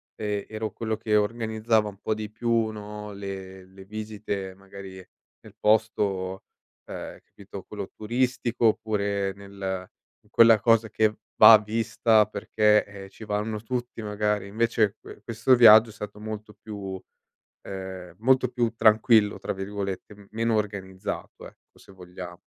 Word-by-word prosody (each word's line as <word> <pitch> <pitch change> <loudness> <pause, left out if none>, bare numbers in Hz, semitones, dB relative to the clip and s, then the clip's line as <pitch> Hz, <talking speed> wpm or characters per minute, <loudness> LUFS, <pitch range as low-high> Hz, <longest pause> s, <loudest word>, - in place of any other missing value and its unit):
ehm, 105 -2 -3
ero 110 0 -4
quello 110 -1 -3
che 110 -1 0
organizzava 110 0 +1
un 100 -1 -9
po' 110 - 0
di 110 -1 -5
più, 115 0 0
no, 105 0 -8
le 95 -1 -8
le 95 +1 -15
visite 105 -2 -5
magari 95 0 -11 0.4
nel - - -16
posto, 100 -3 0 0.4
ehm, - - -8
capito, - - -11
quello - - -7
turistico 120 +1 -1
oppure 100 -3 0
nel 95 -2 -6 0.3
in - - -29
quella 115 -2 +6
cosa 115 -1 +3
che 110 +1 +1 0.2
va 110 +1 +10
vista 110 0 +2
perché, 105 0 +2 0.2
eh, - - -14
ci 110 - -13
vanno 105 +1 -3
tutti 120 0 -4
magari. 105 -1 -1
Invece 110 -1 +1
que - - -13
questo 115 +3 +3
viaggio 110 -1 +8
è - - -11
stato 105 -1 -8
molto 105 0 -7
più, 100 -3 -7 0.6
ehm, 95 -2 -8
molto 130 +1 +3
più 120 -2 0
"tranquillo", 110 -1 +4
tra - - -3
virgolette, 100 +1 -6
meno 115 +1 0
organizzato, 100 -2 -4
ecco, - - -22
se - - -17
vogliamo. 90 -1 -10
105 Hz, 140 wpm, -26 LUFS, 100-110 Hz, 0.6 s, va